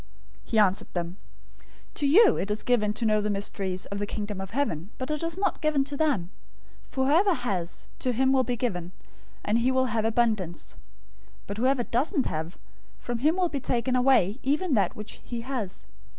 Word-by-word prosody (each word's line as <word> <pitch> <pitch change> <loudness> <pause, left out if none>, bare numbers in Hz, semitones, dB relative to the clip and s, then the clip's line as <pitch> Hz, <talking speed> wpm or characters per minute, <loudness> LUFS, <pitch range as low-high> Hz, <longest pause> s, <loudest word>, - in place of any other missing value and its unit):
013:011 - - -21
He 225 - +1
answered 200 -2 +3
them, 175 +1 -3 0.8
"To 285 - 0
you 410 +9 +7
it 200 - -2
is 210 +1 -1
given 220 -4 +2
to 230 - -2
know 215 -1 +3
the 210 - -1
mysteries 195 -2 -2
of 200 - -5
the 205 - -2
Kingdom 205 -2 -4
of 195 - -6
Heaven, 200 - -2
but 260 +3 -4
it 300 - -2
is 330 +1 -2
not 395 - 0
given 305 -3 +2
to 285 +1 -4
them. 270 - 0 0.6
013:012 - - -29
For 265 -1 0
whoever 350 +8 +4
has, 195 - -3
to 255 - +1
him 260 +2 +2
will 265 -1 +4
be 245 -1 -1
given, 185 -8 -3 0.5
and 215 +3 +2
he 245 +2 +2
will 260 0 +2
have 220 -2 +1
abundance, 220 -6 0 0.7
but 200 - -5
whoever 255 +2 +2
doesn't 270 - 0
have, 160 +3 -4 0.4
from 240 -1 -3
him 305 +6 +3
will 365 -2 +1
be 285 - -2
taken 250 0 0
away 250 -4 +3
even 300 +5 0
that 205 -5 +2
which 210 +1 -8
he 240 -1 -5
has. 230 -7 -5
240 Hz, 200 wpm, -27 LUFS, 200-270 Hz, 0.8 s, you